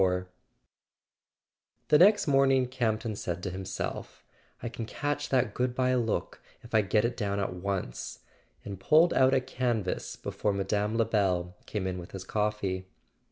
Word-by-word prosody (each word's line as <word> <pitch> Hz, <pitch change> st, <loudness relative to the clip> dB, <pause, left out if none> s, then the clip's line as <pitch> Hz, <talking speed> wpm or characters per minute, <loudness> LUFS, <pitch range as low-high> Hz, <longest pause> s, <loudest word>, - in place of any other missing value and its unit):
XXXIV 90 Hz, -1 st, +2 dB, 1.7 s
iHE 150 Hz, -, +8 dB
next 205 Hz, +2 st, +6 dB
morning 135 Hz, -2 st, +4 dB
Campton 115 Hz, -3 st, -1 dB
said 90 Hz, -2 st, -4 dB
to 95 Hz, -, -2 dB
himself: 95 Hz, 0 st, -5 dB, 0.4 s
"I -, -, -2 dB
JL 115 Hz, -, -8 dB
can 115 Hz, -, -4 dB
catch 145 Hz, +2 st, -2 dB
that 125 Hz, -5 st, +2 dB
goodbye 125 Hz, +1 st, +1 dB
look 120 Hz, -3 st, -1 dB, 0.2 s
if 120 Hz, -, -14 dB
I 110 Hz, -, +5 dB
get 105 Hz, +3 st, +2 dB
it 120 Hz, +1 st, -1 dB
down 100 Hz, -3 st, -1 dB
at 100 Hz, -2 st, -1 dB
once 90 Hz, -7 st, -4 dB, 0.2 s
" -, -, -37 dB
and 100 Hz, -2 st, -6 dB
pulled 160 Hz, -, +5 dB
out 130 Hz, 0 st, +4 dB
a -, -, +4 dB
canvas 120 Hz, -6 st, -2 dB
before 105 Hz, -, -2 dB
Mme. 100 Hz, +2 st, 0 dB
Lebel 95 Hz, -6 st, +1 dB
came 105 Hz, -3 st, -3 dB
in 90 Hz, -1 st, -2 dB
with 85 Hz, -, -10 dB
his 95 Hz, -1 st, -6 dB
coffee. 100 Hz, -2 st, -1 dB
105 Hz, 160 wpm, -29 LUFS, 95-125 Hz, 1.7 s, iHE